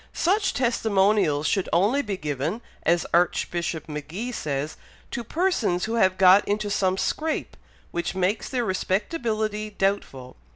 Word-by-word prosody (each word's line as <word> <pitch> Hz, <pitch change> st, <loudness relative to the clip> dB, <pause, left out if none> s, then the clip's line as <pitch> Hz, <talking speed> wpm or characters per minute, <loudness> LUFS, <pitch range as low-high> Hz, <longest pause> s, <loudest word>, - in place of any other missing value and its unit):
Such 390 Hz, +3 st, +2 dB
testimonials 205 Hz, -, +2 dB
should 195 Hz, +2 st, 0 dB
only 210 Hz, +11 st, +3 dB
be 205 Hz, -7 st, -4 dB
given, 150 Hz, -, -3 dB, 0.2 s
as 170 Hz, +1 st, +2 dB
Archbishop 170 Hz, -1 st, 0 dB
Magee 155 Hz, +11 st, -5 dB
says, 150 Hz, -, -3 dB, 0.4 s
to 240 Hz, -, -3 dB
persons 235 Hz, -, 0 dB
who 225 Hz, -, -3 dB
have 190 Hz, -5 st, +3 dB
got 190 Hz, +1 st, +7 dB
into 205 Hz, 0 st, -1 dB
some 190 Hz, -1 st, +1 dB
scrape, 315 Hz, +9 st, -2 dB, 0.4 s
which 170 Hz, +1 st, -3 dB
makes 190 Hz, +3 st, 0 dB
their 245 Hz, -2 st, -1 dB
respectability 215 Hz, -, -1 dB
doubtful. 195 Hz, -11 st, -2 dB
195 Hz, 130 wpm, -25 LUFS, 175-225 Hz, 0.4 s, got